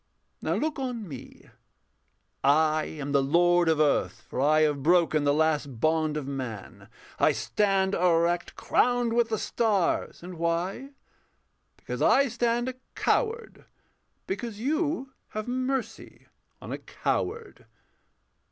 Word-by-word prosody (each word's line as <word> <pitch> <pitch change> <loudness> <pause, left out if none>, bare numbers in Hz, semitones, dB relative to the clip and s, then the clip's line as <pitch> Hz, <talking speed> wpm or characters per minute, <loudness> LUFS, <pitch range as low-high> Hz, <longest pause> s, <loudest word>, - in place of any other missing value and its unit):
Now - - -1
look 310 -1 -2
on 245 -5 -4
me: 135 -6 -11 1.0
I 155 +2 +3
am 145 -2 -6
the 140 -1 +3
lord 175 +4 +3
of 160 -1 +2
earth, 140 -6 +1
For 130 - -3
I 155 +2 +4
have 150 -2 +1
broken 160 -1 +3
the 145 - +4
last 150 -5 0
bond 155 0 +1
of 150 - -4
man. 130 -7 -7 0.3
I - - +4
stand 195 -2 +1
erect, 170 -1 +1
crowned 245 -2 +1
with 235 -1 +2
the 220 - 0
stars 205 -8 0
and 175 -2 -9
why? 175 +10 -1 0.9
Because - - -6
I 275 0 +4
stand 240 +1 0
a 260 - -2 0.2
coward 460 -1 -1 0.6
because 210 +2 -5
you 290 +1 -1 0.2
Have 215 - -3
mercy 255 +1 -3 0.3
on - - -9
a - - -4
coward. 455 0 -3
175 Hz, 130 wpm, -27 LUFS, 155-240 Hz, 1.0 s, I